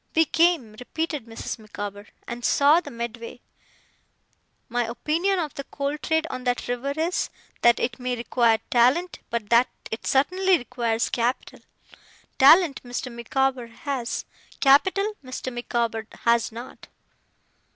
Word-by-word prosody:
'We 325 Hz, 0 st, +5 dB
came,' 325 Hz, -10 st, +2 dB
repeated 300 Hz, 0 st, -4 dB
Mrs. 225 Hz, 0 st, -6 dB
Micawber, 205 Hz, -1 st, -7 dB, 0.2 s
'and 240 Hz, 0 st, -6 dB
saw 290 Hz, +6 st, +5 dB
the 295 Hz, -, -9 dB
Medway. 235 Hz, -1 st, -6 dB, 1.3 s
My 245 Hz, -1 st, 0 dB
opinion 320 Hz, +11 st, 0 dB
of 315 Hz, -5 st, -2 dB
the 275 Hz, -, -6 dB
coal 280 Hz, +1 st, -3 dB
trade 320 Hz, +2 st, 0 dB
on 255 Hz, -, -5 dB
that 245 Hz, 0 st, -1 dB
river 245 Hz, +3 st, -2 dB
is, 335 Hz, +3 st, 0 dB, 0.3 s
that 235 Hz, 0 st, +5 dB
it 240 Hz, +1 st, -2 dB
may 250 Hz, 0 st, -2 dB
require 235 Hz, -1 st, +2 dB
talent, 255 Hz, +9 st, +3 dB
but 230 Hz, -2 st, -3 dB
that 235 Hz, +2 st, +5 dB, 0.2 s
it 220 Hz, -, -5 dB
certainly 365 Hz, +7 st, +3 dB
requires 235 Hz, -3 st, -1 dB
capital. 245 Hz, +2 st, -1 dB, 0.8 s
Talent, 300 Hz, +1 st, +6 dB
Mr. 245 Hz, +1 st, -5 dB
Micawber 260 Hz, +1 st, -1 dB
has; 245 Hz, +1 st, -4 dB, 0.3 s
capital, 380 Hz, +10 st, +4 dB
Mr. 255 Hz, 0 st, -6 dB
Micawber 235 Hz, -2 st, -2 dB, 0.2 s
has 235 Hz, -1 st, +3 dB
not. 235 Hz, +3 st, -10 dB
250 Hz, 130 wpm, -25 LUFS, 235-300 Hz, 1.3 s, Talent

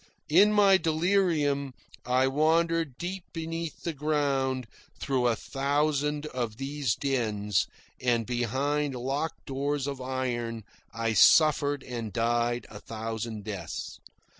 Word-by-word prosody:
In 210 Hz, +1 st, +6 dB
my 200 Hz, -2 st, +6 dB
delirium 160 Hz, -6 st, +1 dB, 0.3 s
I 130 Hz, +1 st, +3 dB
wandered 160 Hz, +1 st, +2 dB
deep 180 Hz, +1 st, -4 dB
beneath 165 Hz, -1 st, -5 dB
the 170 Hz, -, -2 dB
ground 140 Hz, -3 st, 0 dB, 0.3 s
through 130 Hz, -3 st, +1 dB
a 115 Hz, -, +2 dB
thousand 145 Hz, +3 st, 0 dB
of 120 Hz, -7 st, -4 dB
these 135 Hz, -3 st, -1 dB
dens, 105 Hz, -8 st, 0 dB, 0.3 s
and 120 Hz, -3 st, +1 dB
behind 135 Hz, +4 st, -1 dB
locked 135 Hz, +6 st, -3 dB
doors 140 Hz, 0 st, -1 dB
of 140 Hz, -2 st, -4 dB
iron 120 Hz, -3 st, -3 dB, 0.3 s
I 115 Hz, -1 st, -1 dB
suffered 145 Hz, -, +5 dB
and 115 Hz, -4 st, -5 dB
died 120 Hz, +1 st, 0 dB
a 105 Hz, -, -8 dB
thousand 110 Hz, -1 st, -5 dB
deaths. 95 Hz, -7 st, -6 dB
135 Hz, 115 wpm, -28 LUFS, 120-150 Hz, 0.3 s, In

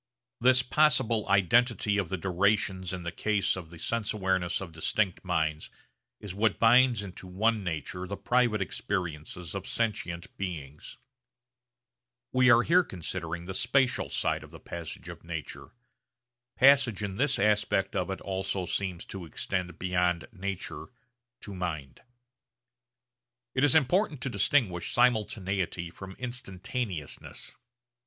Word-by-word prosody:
This 130 Hz, +1 st, +5 dB
possible 125 Hz, -6 st, +2 dB
identity 105 Hz, +2 st, +3 dB
of 95 Hz, -5 st, -2 dB
the 95 Hz, -, -2 dB
durations 95 Hz, 0 st, +1 dB
in 90 Hz, -2 st, -5 dB
the 85 Hz, -, -3 dB
case 105 Hz, +3 st, +1 dB
of 90 Hz, -4 st, -8 dB
the 85 Hz, -, -12 dB
sense 110 Hz, +6 st, -1 dB
awareness 95 Hz, -4 st, 0 dB
of 95 Hz, -3 st, -7 dB
distinct 90 Hz, +4 st, 0 dB
minds 80 Hz, -4 st, -1 dB, 0.5 s
is 100 Hz, -3 st, -7 dB
what 105 Hz, +1 st, +1 dB
binds 120 Hz, -1 st, +5 dB
into 95 Hz, -1 st, -9 dB
one 105 Hz, +3 st, +1 dB
nature 90 Hz, +2 st, -4 dB
the 100 Hz, -, -4 dB
private 110 Hz, 0 st, +2 dB
experiences 85 Hz, -3 st, -4 dB
of 100 Hz, -2 st, -5 dB
sentient 90 Hz, -7 st, -2 dB
beings. 75 Hz, -7 st, -6 dB, 1.3 s
We 130 Hz, 0 st, +5 dB
are 120 Hz, -1 st, +7 dB
here 180 Hz, +5 st, +5 dB
considering 85 Hz, -, -5 dB
the 95 Hz, -, -5 dB
spatial 125 Hz, +5 st, +1 dB
side -, -, 0 dB
of -, -, -12 dB
the -, -, -12 dB
passage 85 Hz, -3 st, -7 dB
of -, -, -9 dB
nature. -, -, -6 dB, 0.9 s
Passage 130 Hz, -6 st, +5 dB
in 100 Hz, -2 st, -3 dB
this 140 Hz, +1 st, +2 dB
aspect 105 Hz, -2 st, +2 dB
of 90 Hz, -, -1 dB
it 95 Hz, -, -4 dB
also 95 Hz, -1 st, -2 dB
seems 95 Hz, -2 st, -3 dB
to 95 Hz, -3 st, -7 dB
extend 90 Hz, +2 st, -3 dB
beyond 90 Hz, -2 st, 0 dB
nature 100 Hz, -2 st, -5 dB, 0.5 s
to 105 Hz, -, -8 dB
mind. 80 Hz, -9 st, -5 dB, 1.5 s
It 130 Hz, -, +1 dB
is 145 Hz, -1 st, +5 dB
important 160 Hz, -, +3 dB
to 135 Hz, -, -2 dB
distinguish 100 Hz, -3 st, +1 dB
simultaneity 100 Hz, -7 st, +1 dB
from 95 Hz, +2 st, -9 dB
instantaneousness. 110 Hz, -, -4 dB
95 Hz, 135 wpm, -29 LUFS, 90-115 Hz, 1.5 s, are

